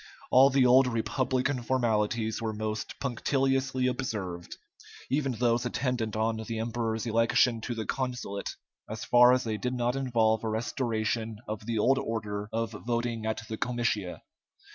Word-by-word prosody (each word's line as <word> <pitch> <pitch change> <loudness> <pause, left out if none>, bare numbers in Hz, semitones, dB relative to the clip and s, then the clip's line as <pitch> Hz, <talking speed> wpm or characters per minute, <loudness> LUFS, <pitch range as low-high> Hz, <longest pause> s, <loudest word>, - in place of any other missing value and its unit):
All 130 +2 +7
the 135 -1 +3
old 125 +1 +6
republican 130 +2 0
formalities 115 -2 0
were 110 -1 -2
most 110 0 -4
punctiliously 135 0 0
observed 105 -9 -3 0.5
even 135 -1 +1
those 120 0 +1
attendant 125 -3 -2
on 110 +1 0
the 110 +1 -5
emperor's 115 0 -2
election 115 +1 +2
to 120 - -4
the 110 -1 -3
consulate, 125 -5 -3 0.3
so 110 - -3
far 120 +3 +5
as 130 0 +2
they 110 -2 -2
did 125 +3 -2
not 120 +1 0
involve 115 -5 +1
a 110 - -1
restoration 110 -1 -2
of 105 0 -5
the 115 -1 -1
old 135 +5 +3
order 105 -3 -3
of 115 0 -2
voting 115 -1 -2
at 110 +1 -2
the 110 - -5
comitia. 115 -6 -2
115 Hz, 150 wpm, -29 LUFS, 110-125 Hz, 0.5 s, All